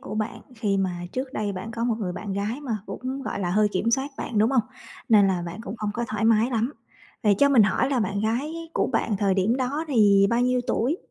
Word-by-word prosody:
của 210 - -7
bạn, 215 0 -3
khi 210 -4 0
mà 190 -1 +1 0.2
trước 260 +1 -4
đây 210 -4 -2
bạn 195 +4 -6
có 230 0 -3
một 240 - +1
người 185 -5 -3
bạn 200 +2 -5
gái 205 +7 -2
mà 250 -7 -2
cũng, 260 +2 -5
gọi 200 - -4
là, 175 - -1
hơi 210 +3 +3
kiểm 225 +5 0
soát 270 +3 0
bạn, 225 - -2
đúng 220 +3 +4
hông? 255 -4 +3 0.5
Nên 210 -4 +6
là 180 -2 0
bạn 175 +5 -7
cũng 205 - -6
hông 210 -1 -2
có 235 - -1
thoải 215 -2 -2
mái 225 +2 +4
lắm. 235 +2 0 0.5
Vậy 210 -3 +4
cho 280 - +5
mình 260 -6 +6
hỏi 210 +7 +1
là 260 - +1
bạn 200 -2 -1
gái 240 +9 -1 0.2
của - - +1
bạn 225 -2 0
thời 195 -1 +1
điểm 200 +6 +2
đó 275 +5 -2
thì 205 -6 +5
bao 235 +1 +2
nhiêu 250 0 +2
tuổi? 265 +9 0
220 Hz, 255 wpm, -25 LUFS, 200-250 Hz, 0.5 s, Nên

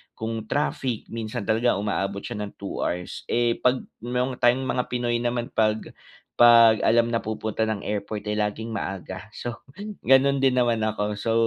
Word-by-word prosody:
Kung 110 -1 -4
traffic 130 -4 -2
minsan 110 -3 -4
talaga 115 +3 +2
umaabot 100 -1 -2
siya 120 -4 -5
ng 105 -1 -5
2 100 - -6
hours. 90 0 -3
Eh, 120 -1 +1
'pag 125 0 +2 0.2
ma 125 +2 -1
yong 130 -1 -4
time 120 +2 +3
mga 125 -1 -1
Pinoy 120 -1 -1
naman, 120 0 -2
'pag 110 0 0 0.5
'pag 115 -2 +8
alam 115 +1 +4
na 115 - +1
pupunta 110 0 -2
ng 105 -2 -2
airport 105 0 -3
ay - - 0
laging 105 +2 -2
maaga. 95 -1 -5
So 120 0 -6 0.4
ganun 135 +1 +5
din 135 -1 +4
naman 120 -2 +2
ako 105 -1 -1
so, 115 +2 -1
115 Hz, 175 wpm, -25 LUFS, 105-120 Hz, 0.5 s, pag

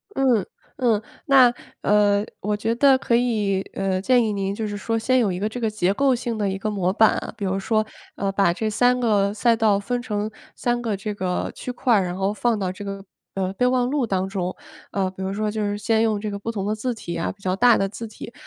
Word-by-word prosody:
嗯 250 -8 +2 0.3
嗯。 230 -5 +2 0.2
那， 260 -3 +6 0.3
呃， 205 0 +3
我 210 +1 -1
觉 220 +2 -1
得 270 +1 +5
可 245 -2 +1
以， 210 -6 +1
呃， 190 -1 -1
建 250 +3 +4
议 220 - 0
您 195 0 -2
就 220 -1 -3
是 205 0 -4
说， 225 +2 -1
先 255 +3 +2
有 215 -6 +2
一 180 - -3
个 210 +2 -1
这 245 - -6
个 225 - 0
结 195 -3 0
构 270 +2 +3
性 235 -2 -3
的 205 -2 0
一 190 - -2
个 215 +2 -3
模 185 -3 0
板 220 0 +5
啊， - - -6
比 205 - -3
如 190 +1 0
说， 215 +2 +1 0.3
呃， 195 -1 -1
把 195 -3 +2
这 220 +4 -2
3 245 +3 +3
个 205 -4 +2
赛 230 +1 +3
道 215 -3 +3
分 245 +4 -2
成 215 -3 -3 0.2
3 240 0 -1
个 225 -3 -1
这 210 +2 -4
个 185 -3 -2
区 250 - -6
块 245 -1 +2
儿， 200 - +3
然 180 0 -3
后 195 +2 0
放 235 +1 +1
到 185 -2 -1
这 205 +2 -8
个， 195 0 -6 0.3
呃， 190 -1 -1
备 250 +5 +1
忘 250 -1 +2
录 280 -4 +1
当 190 -2 0
中。 185 -2 -3 0.4
呃， 190 -2 0
比 190 - -10
如 190 +1 -2
说 215 +1 -1
就 215 0 -3
是 205 0 -1
先 220 +2 +1
用 215 -2 +1
这 215 - -3
个 200 - -4
不 230 - -4
同 200 -3 -3
的 210 - 0
字 245 +3 -2
体 170 -6 -6
啊， 165 - -2
比 200 - -18
较 185 -1 0
大 240 +2 +5
的 195 - +1
字 230 +2 -7
体， 220 +2 -10
210 Hz, 265 characters per minute, -23 LUFS, 195-235 Hz, 0.4 s, 那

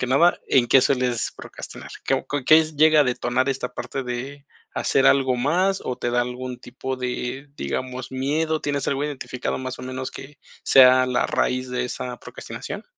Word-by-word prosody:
que 125 - -1
nada, 165 +7 +4
¿en 125 -3 +4
qué 135 - +6
sueles 125 -4 0
procrastinar? - - -10
¿Qué - - 0 0.2
qué 160 +1 +7
llega 155 +1 +6
a - - +5
detonar 125 +1 0
esta 135 -2 -2
parte 135 - -5
de 130 +3 -6 0.3
hacer 135 0 +2
algo 130 -2 +4
más 180 +10 +1
o 125 - -2
te 120 - -2
da 120 0 +2
algún 125 0 -6
tipo 130 +1 -6
de, 125 +2 -4
digamos, 130 -1 -4
miedo? 155 +4 -1
¿Tienes 145 -1 -2
algo 140 +1 0
identificado, 135 -3 -4
más 130 -1 -5
o - - -8
menos, 130 0 -5
que 135 +1 -11 0.3
sea 130 -1 +7
la 125 -1 +1
raíz 130 0 0
de 125 0 -1
esa 125 0 -5
procrastinación? - - -8
130 Hz, 175 wpm, -23 LUFS, 125-140 Hz, 0.3 s, qué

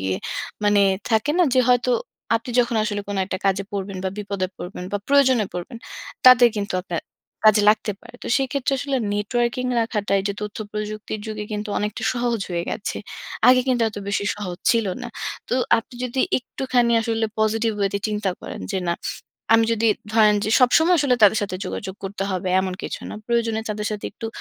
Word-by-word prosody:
গিয়ে 95 0 -1 0.5
মানে 205 -1 +4 0.3
থাকে 220 +6 +2
না 360 - +6
যে 255 - +5
হয়তো 250 0 +3 0.5
আপনি 230 +2 -6
যখন 235 -1 0
আসলে 205 -2 -2
কোন 200 - -3
একটা 190 - -3
কাজে 195 +1 +1
পড়বেন 195 -1 -4
বা - - +1
বিপদে 200 -2 -2
পড়বেন 180 0 -7
বা 205 - 0
প্রয়োজনে 260 -5 +4
পড়বেন, 180 +6 -6 0.5
তাদের 255 -1 +9
কিন্তু 200 -1 -2
আপনার 175 -2 -4 0.4
কাজে 215 -1 +6
লাগতে 215 -1 0
পারে। 240 0 -15
তো - - -6
সেইক্ষেত্রে 270 0 -1
আসলে 275 0 -1 0.2
নেটওয়র্কিং 240 +4 0
রাখাটাই 205 -3 0
যে 200 - 0
তথ্য 210 +1 -5
প্রযুক্তির 215 0 -4
যুগে 215 -1 -4
কিন্তু 210 +1 -3
অনেকটা 210 0 -3
সহজ 240 -2 -1
হয়ে 170 -1 -1
গেছে। 210 - -4 0.5
আগে 255 0 +7
কিন্তু 245 -2 +2
এত 210 - -12
বেশি 200 0 0
সহজ 185 -3 -5
ছিল 230 -3 +2 0.2
না। 245 - -5 0.4
তো - - 0 0.2
আপনি 230 +2 -9
যদি 250 +1 -1 0.2
একটুখানি 245 -1 0
আসলে 225 0 0
পজিটিভ 220 +1 +1
ওয়েতে 200 0 0
চিন্তা 210 -2 -1
করেন - - -7
যে 190 - 0
না 170 - +2 0.6
আমি 225 0 +6
যদি 225 0 +1 0.3
ধরেন 215 -2 +5
যে 215 - -1
সবসময় 320 +8 +5
আসলে 275 -3 +3
তাদের 210 +1 +7
সাথে 185 -2 -3
যোগাযোগ 190 -1 -5
করতে 195 0 -4
হবে 185 0 -2
এমন 185 -1 -2
কিছু - - -5
না। - - -6
প্রয়োজনে 230 -2 +1
তাদের 210 0 -3
সাথে 210 -1 -5
একটু 225 - -6
215 Hz, 185 wpm, -22 LUFS, 200-240 Hz, 0.6 s, তাদের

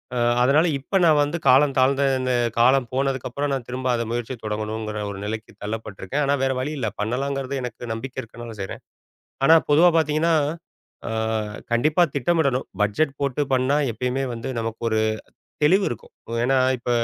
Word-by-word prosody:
அ - - 0 0.2
அதனால, 150 +6 +4
இப்ப 190 +8 0
நான் 155 -2 +5
வந்து 150 +4 -2
காலம் 135 +1 +5
தாழ்ந்த 135 +2 +3 0.2
இந்த 130 -1 0 0.3
காலம் 130 +1 +4
போனதுக்கப்புறம், 135 +1 -1
நான் 130 -3 -3
திரும்ப 130 +1 -4
அத 115 - -1
முயற்சிய 120 +1 -3
தொடங்கணுங்கிற 105 0 -3
ஒரு 95 - -7
நிலைக்கு 110 +1 -5
தள்ளப்பட்ருக்கேன். 110 +5 -3
ஆனா 140 +1 +2
வேற 135 0 +2
வழி 140 +4 -2
இல்ல. 115 -5 -1
பண்ணலாங்கிறது 135 +4 -2
எனக்கு 120 -1 -6
நம்பிக்கை 130 +3 -6
இருக்கனால 115 0 -10
செய்றேன். 95 - -6 0.7
ஆனா 165 - +8
பொதுவா 170 +4 +6
பார்த்தீங்கன்னா, 160 +1 +2 0.7
அ - - -4 0.6
கண்டிப்பா 155 +8 +3
திட்டமிடணும். 140 -2 +1 0.2
பட்ஜெட் 135 +7 0
போட்டு 140 +1 0
பண்ணா, 130 +3 +2 0.2
எப்பயுமே 125 +4 -2
வந்து 125 +3 -5
நமக்கு 115 0 -5
ஒரு 110 0 +2 0.6
தெளிவுருக்கும். 180 - +1 0.2
ஓ - - -5
ஏன்னா, 135 0 +3 0.2
இப்ப 120 - -4
130 Hz, 155 wpm, -23 LUFS, 115-140 Hz, 0.7 s, ஆனா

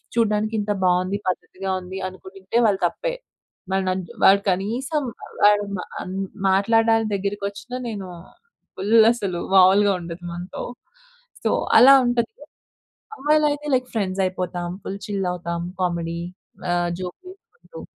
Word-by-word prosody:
చూడడానికి 215 -1 +1
ఇంత 210 0 -1
బావుంది, 185 +2 +2
పద్ధతిగా 190 +1 -4
ఉంది, 185 +1 -8
అనుకుంటుంటే, 190 +2 -6
వాళ్ళ 200 -2 +2
తప్పే. - - -4 0.6
వాడు 190 0 +1
నన్ను 185 -1 -2 0.2
వాడు 200 +1 +7
కనీసం 240 - -1 0.4
వాడు 205 0 +6
మ - - -6 0.2
అం 185 - -7 0.4
మాట్లాడడానికి 225 +3 +3
దగ్గరకి 200 +1 -3
వచ్చిన, 205 +5 -13 0.2
నేను 200 -4 -5 0.7
ఫుల్ 210 +4 +4
అసలు 195 -7 -3 0.2
మామూలుగా 195 +2 +6
ఉండదు 170 +1 -8
మనతో. 175 +2 -6 0.8
సో, - - +2 0.3
అలా 270 +2 +9
ఉంటది. 235 -2 0 0.9
అమ్మాయిలయితే 300 0 +1
లైక్ 255 0 0
ఫ్రెండ్స్ 195 -3 -1
అయిపోతాం. 180 -1 -3 0.2
ఫుల్ 195 +1 -5
చిల్ 200 -2 -2
అవుతాం. 170 -1 -4 0.2
కామెడీ 170 -2 -1 0.5
ఆహ్, 175 0 +1
జోక్‌లు 185 - -7
వేసకుంటు 460 +4 -14
200 Hz, 125 wpm, -23 LUFS, 185-225 Hz, 0.9 s, అలా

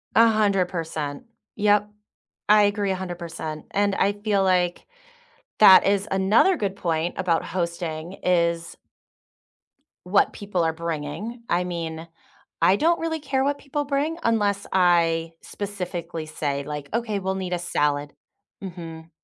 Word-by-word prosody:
100%. 190 - +1 0.3
Yep. 210 0 +2 0.6
I 210 0 +7
agree 205 -1 +1
100%. 175 -4 -5
And 200 0 +1
I 200 +1 +2
feel 205 -1 0
like 180 -2 +1 0.7
that 190 -3 +9
is 200 +1 +1
another 205 - +3
good 195 -5 -2
point 170 -2 -1
about 175 -4 0
hosting, 170 -1 -4
is 170 -2 +1 1.3
what 195 +2 +3
people 200 -4 -2
are 160 0 +1
bringing. 170 +8 -5
I 175 +1 +1
mean, 165 -2 -5 0.5
I 190 - +5
don't 335 +8 +2
really 325 -1 -2
care 270 -2 -1
what 285 +1 0
people 290 +1 -3
bring 290 +4 -1
unless 205 -3 +1
I 165 -3 +3
specifically 180 -5 -5
say, 145 -2 -3
like, 150 0 -6
"Okay, 220 -3 -1
we'll 190 0 -2
need 185 -2 -3
a 175 - -1
salad." 145 -4 0 0.5
Mhm. 165 -3 -8
185 Hz, 130 wpm, -24 LUFS, 165-205 Hz, 1.3 s, that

